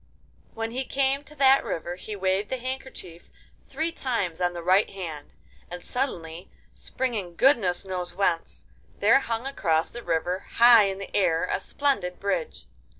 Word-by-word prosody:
When 225 0 -3
he 260 +3 -2
came 275 +1 0
to 300 - -15
that 270 -1 +5
river 175 +2 -4
he 210 +3 -7
waved 190 +1 0
the 260 - -2
handkerchief 255 -9 -7 0.4
three 320 +4 -2
times 205 - -2
on 175 0 +1
the 170 -1 -6
right 185 +4 +4
hand, 165 -7 -7 0.4
and 175 0 -8
suddenly, 175 -9 -4 0.2
springing 215 -9 -3
goodness 200 -7 +3
knows 180 -2 -5
whence, 175 -4 -1 0.3
there 220 +6 +5
hung 230 -2 -3
across 165 -12 0
the 240 - -7
river, 175 0 -1
high 235 -2 +7
in 195 -1 -2
the 195 - -8
air, 165 -4 +2
a - - 0
splendid 195 -6 -1
bridge. 460 - -3
200 Hz, 155 wpm, -26 LUFS, 175-260 Hz, 0.4 s, high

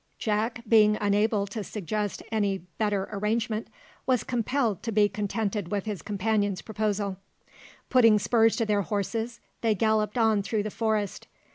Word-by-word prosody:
Jack, 225 +2 -1
being 215 -2 +5
unable 205 0 +2
to 210 +1 -5
suggest 210 +1 -3
any 205 -3 +1 0.2
better 205 -3 0
arrangement, 215 +2 -1 0.4
was 255 -3 +2
compelled 240 -4 0
to 230 - -3
be 210 -1 +4
contented 205 -1 -2
with 205 -1 -1
his 205 -6 -4
companion's 205 -1 -1
proposal. 210 -3 -2 0.7
Putting 230 -4 +6
spurs 225 +1 +3
to 230 - 0
their 210 -1 +2
horses, 220 +4 -3 0.2
they 225 -2 +2
galloped 215 +1 +1
on 220 -3 +3
through 210 +1 -1
the 215 - -4
forest. 215 -3 -1
215 Hz, 145 wpm, -27 LUFS, 205-225 Hz, 0.7 s, Putting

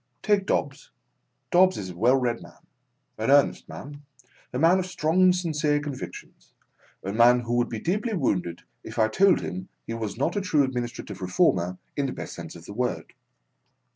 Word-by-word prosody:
Take 205 -2 +2
Dobbs. - - -1 0.6
Dobbs 185 +1 +5
is 95 -2 -5
a - - -11
well 120 +8 +4
read 125 -3 0
man, - - -16 0.5
an 110 - -1
earnest 140 0 +3
man, 145 +1 -9 0.5
a - - -3
man 165 +6 +4
of 185 - -3
strong 170 0 +1
and 185 -1 +6
sincere 155 -4 0
convictions, 145 -3 -8 0.5
a 95 - -3
man 120 +2 +5
who 120 0 -3
would 120 0 +1
be 115 - -4
deeply 210 - -1
wounded 90 - -1 0.2
if - - -9
i 110 - +4
told 190 - +4
him 95 +1 -6 0.2
he 115 - -5
was 110 -3 -4
not 155 +7 0
a 205 - 0
true 155 -7 +2
Administrative 120 -6 -4
Reformer 90 0 +1 0.2
in 140 -1 0
the 130 - -4
best - - -7
sense 85 -2 -8
of 85 0 -12
the 100 - -8
word. 125 +3 -3
130 Hz, 185 wpm, -26 LUFS, 110-175 Hz, 0.6 s, and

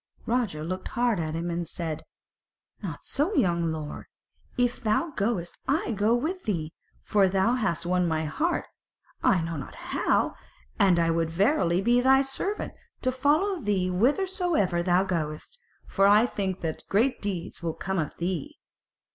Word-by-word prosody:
Roger 225 -11 0
looked 185 +3 -4
hard 235 -5 +1
at 160 -1 -2
him 170 +1 -2
and 170 0 -2
said: 160 -2 -4 0.8
"Not - - -5
so, 320 +9 0
young 170 -3 +2
lord; 155 -2 -6 0.5
if 245 -1 +1
thou 225 +9 +1
goest 200 -7 -2
I 285 +1 +1
will - - 0
go 210 +3 +2
with 345 +9 -2
thee, 165 -7 -2 0.3
for 200 -3 +3
thou 195 +5 +2
hast 210 -10 0
won 180 0 +2
my 160 -1 0
heart, 310 - -1 0.6
I 185 - +3
know 165 -1 -3
not 135 - -7
how: - - 0 0.5
and 185 -3 +5
I 165 -1 +3
would 165 0 0
verily 185 - +2
be 240 +3 +4
thy 265 +1 +5
servant, 385 +10 -3 0.3
to 255 - +2
follow 310 +9 +2
thee 200 - 0
whithersoever 285 - +1
thou 180 +1 +3
goest; 165 - -3 0.3
for 195 0 +3
I 210 +3 +6
think 195 -5 -3
that 160 -2 -3
great 240 +5 +2
deeds 190 -5 -4
will 165 -2 -2
come 190 0 -2
of 155 - -3
thee." 190 - -3
195 Hz, 165 wpm, -27 LUFS, 170-250 Hz, 0.8 s, I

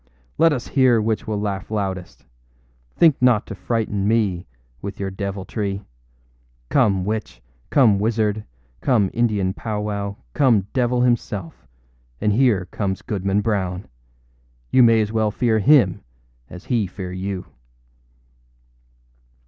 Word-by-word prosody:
âLet 165 0 +6
us 130 -5 -3
hear 130 -4 +4
which 110 +2 -1
will 105 -2 -1
laugh 100 -2 -3
loudest. 95 -4 -4 0.7
Think 160 -6 +4
not 125 -4 +4
to - - -7
frighten 105 0 -2
me 105 -6 +1 0.3
with 100 0 -6
your 95 -1 -3
deviltry. 100 +1 -4 0.9
Come 95 -3 +2
witch, 105 - -4 0.3
come 115 -8 +4
wizard, 110 -1 0 0.4
come 105 - +2
Indian 105 -5 +1
powwow, 105 -2 -3 0.2
come 120 -9 +3
devil 125 -1 +1
himself, 105 -8 -1 0.5
and 105 - +1
here 110 -6 +3
comes 95 -2 -3
Goodman 100 0 -1
Brown. 95 -4 -2 0.9
You 130 - +5
may 115 -2 +6
as 105 0 -2
well 110 -1 +1
fear 110 +1 +1
him 105 - +4 0.5
as 90 +1 -11
he 115 -6 0
fear 90 0 -7
you. 95 0 -4
105 Hz, 125 wpm, -21 LUFS, 95-115 Hz, 0.9 s, âLet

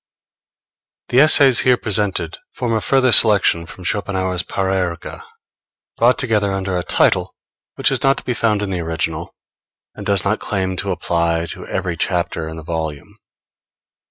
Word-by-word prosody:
The 125 - +3
Essays 140 -4 +6
here 125 -1 +3
presented 95 -7 -2 0.2
form 120 -2 -2
a 110 - 0
further 130 0 +2
selection 100 -6 +5
from 90 - -12
Schopenhauer's 95 -2 -1
Parerga, 95 -3 -3 0.7
brought 120 +2 +3
together 105 -6 +1
under 95 -1 -3
a 90 - 0
title - - +1 0.4
which - - +1
is - - -2
not 135 0 +2
to - - -7
be 125 - -2
found 110 -3 0
in 100 - -3
the 90 - -2
original, 80 +1 -4 0.6
and - - -9
does 100 -2 +2
not 110 +2 0
claim 95 -2 -2
to - - -3
apply 85 -1 -1
to - - -9
every 90 -3 -3
chapter 85 -3 -2
in 80 - -8
the 80 - -9
volume. 80 +3 -5
95 Hz, 155 wpm, -18 LUFS, 85-110 Hz, 0.7 s, Essays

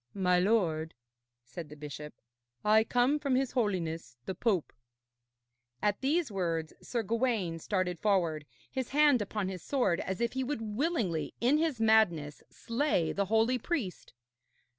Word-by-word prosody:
'My 180 -2 +3
lord,' 175 -6 +1 0.5
said 160 +5 -8
the 150 - -10
bishop, 150 -1 -8 0.5
'I 215 +1 +5
come 250 +6 +2
from 280 -3 0
his 265 0 +1
Holiness 170 - -2
the 190 - -3
Pope.' 190 -3 0 1.1
At 205 -1 0
these 295 0 +1
words 165 -5 -2
Sir 235 -2 -2
Gawaine 220 -6 0
started 180 -1 -1
forward, 170 -7 +1 0.2
his 260 -2 -3
hand 290 -4 +4
upon 205 -1 -2
his 185 -2 -5
sword, 245 - +1
as 190 0 -3
if 235 -1 0
he 265 0 -1
would 225 -6 -3
willingly 230 - -1
in 265 +6 +3
his 315 -7 0
madness 185 -10 +3
slay 230 - 0
the 200 - 0
holy 225 +5 +2
priest. 240 - -3
210 Hz, 145 wpm, -31 LUFS, 170-250 Hz, 1.1 s, I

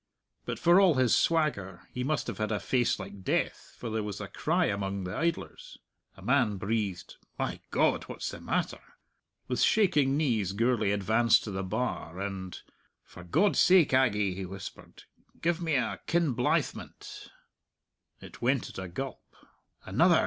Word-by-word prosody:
But - - -3
for 175 +3 +5
all 180 -6 +5
his 130 -3 +4
swagger 100 - +1
he 125 - -3
must 150 +3 -1
have 115 -4 -5
had 110 0 -1
a 105 - 0
face 125 -2 +1
like 100 0 -9
death, - - -2
for 115 - -5
there 110 0 -1
was 105 -2 -5
a - - -5
cry - - 0
among 100 -1 -2
the 90 0 -5
idlers. 170 0 -3 0.4
A 95 - -13
man 120 -3 +2
breathed, 100 -2 -3 0.2
"My - - -2
God! - - +2
What's - - -5
the - - -9
matter?" - - -2 0.7
With 125 - -1
shaking 150 -10 +3
knees 110 - +1
Gourlay 115 -1 +1
advanced 110 +3 +3
to 105 - -5
the 95 0 -3
bar, 95 -3 -3
and, 95 -2 -5 0.4
"For 90 - -13
God's 165 - +2
sake, 180 -7 +5
Aggie," 105 -7 +3
he 95 +1 -5
whispered, 95 +1 -9 0.4
"give 170 +1 0
me 160 -3 0
a 130 - 0
Kinblythmont!" 165 -7 -1 0.9
It - - -12
went 130 +1 +1
at - - -8
a 95 - -5
gulp. 135 +10 -5 0.6
"Another!" - - +4
110 Hz, 160 wpm, -29 LUFS, 95-140 Hz, 0.9 s, for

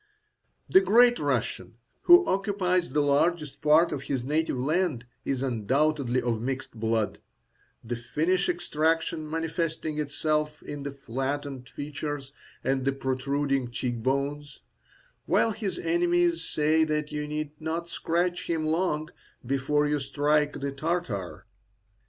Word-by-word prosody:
The 380 - +6
Great 245 - +5
Russian, 125 -5 -1 0.3
who 350 +1 +8
occupies 190 - +1
the 150 -1 +1
largest 150 +1 +1
part 155 +3 +5
of 145 -3 -3
his 135 -3 -2
native 150 +1 0
land, 150 -2 0 0.2
is 135 -1 -1
undoubtedly 130 +2 +1
of 115 -2 -1
mixed 130 +1 -3
blood, 110 -1 0 0.6
the 120 +1 -3
Finnish 160 +11 0
extraction 165 -2 0
manifesting 160 -1 -2
itself 150 +1 -1
in 145 -1 -6
the 140 0 -4
flattened 135 0 -4
features 145 -1 -5 0.3
and 135 0 0
the 135 +1 +1
protruding 135 0 -1
cheek 120 -1 -3
bones; 140 +3 -2 0.7
while 225 - +3
his 205 -3 -3
enemies 345 0 +2
say 155 +1 +2
that 150 -1 -1
you 150 0 -3
need 150 0 -3
not 165 +2 -3
scratch 175 +1 -1
him 160 -2 0
long 155 -1 0 0.4
before 140 +3 +1
you 150 0 +1
strike 145 +2 +1
the 140 0 -2
Tartar. 140 - -3
150 Hz, 130 wpm, -27 LUFS, 135-165 Hz, 0.7 s, who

